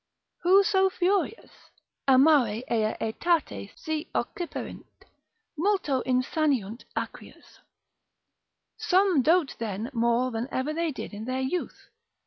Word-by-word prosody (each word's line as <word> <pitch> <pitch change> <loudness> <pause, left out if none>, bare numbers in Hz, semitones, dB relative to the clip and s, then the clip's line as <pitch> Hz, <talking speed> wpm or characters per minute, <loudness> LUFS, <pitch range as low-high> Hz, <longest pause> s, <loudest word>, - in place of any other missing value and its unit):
Who 380 +3 +6
so 385 -2 +3
furious? 385 +4 -1 0.6
Amare 260 -5 +4
ea 220 -2 +1
aetate 330 +10 -1
si 315 -6 -4
occiperint, 350 -2 -4 0.7
multo 320 -6 +1
insaniunt 255 -3 0
acrius. - - -7 1.2
Some 370 -5 +3
dote 325 +1 +2
then 220 +2 -4
more 235 +2 +1
than 230 +2 -3
ever 275 +4 -1
they 330 0 -1
did 260 - -7
in 210 +2 -6
their 255 +1 -2
youth. 270 +7 -4
285 Hz, 110 wpm, -27 LUFS, 235-350 Hz, 1.2 s, Who